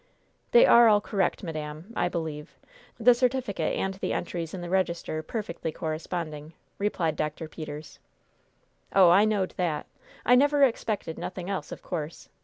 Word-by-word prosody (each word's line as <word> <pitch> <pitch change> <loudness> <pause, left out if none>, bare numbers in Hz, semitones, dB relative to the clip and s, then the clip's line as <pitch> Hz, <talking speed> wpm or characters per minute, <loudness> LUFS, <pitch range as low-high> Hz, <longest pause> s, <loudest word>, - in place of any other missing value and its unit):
"They 485 +1 +7
are 235 - +7
all 210 -1 +6
correct, 200 -1 -1
madam, 155 +4 -6
I 175 - +1
believe 160 -2 -5 0.4
the 245 +2 +7
certificate 250 -3 0
and 190 - -1
the 190 - -3
entries 170 -2 -3
in 185 - -6
the 175 - -6
register 170 -4 -1
perfectly 170 -3 -4
corresponding," 155 -1 -5 0.3
replied 175 -6 0
Dr. 155 +2 -3
Peters. 155 -1 -8 1.0
"Oh, 185 -3 +7
I 200 +4 +6
knowed 205 -4 0
that; 170 -5 -1 0.4
I 245 - +5
never 285 +3 +5
expected 215 -9 0
nothing 185 +1 -5
else, 170 -7 -4
of - - -8
course. 160 -3 -5
175 Hz, 150 wpm, -27 LUFS, 155-210 Hz, 1.0 s, They